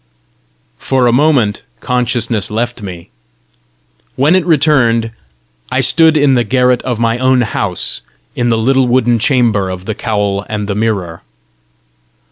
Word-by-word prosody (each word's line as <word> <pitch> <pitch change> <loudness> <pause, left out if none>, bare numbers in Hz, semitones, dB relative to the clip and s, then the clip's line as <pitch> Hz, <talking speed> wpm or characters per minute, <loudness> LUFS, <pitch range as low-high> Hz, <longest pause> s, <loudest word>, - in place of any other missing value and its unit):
For 130 -2 0
a 120 - +3
moment 130 -7 +2 0.2
consciousness 120 -4 -1
left 120 +2 -3
me. 90 -4 -9 1.0
When 145 +6 +2
it 185 - +2
returned, 130 -8 +2 0.6
I - - +1
stood 160 -1 +3
in 145 -2 +3
the 120 -2 +2
garret 125 +2 +1
of 125 -3 -3
my 115 +1 0
own 130 0 +2
house, 100 -5 -2 0.3
in 120 -1 0
the 115 - +1
little 130 +3 +2
wooden 120 -1 +2
chamber 110 -7 +1
of 90 0 -7
the 110 - -3
cowl 100 -3 -2
and 105 -1 -3
the 100 - -2
mirror. 100 -6 -2
120 Hz, 140 wpm, -13 LUFS, 105-130 Hz, 1.0 s, a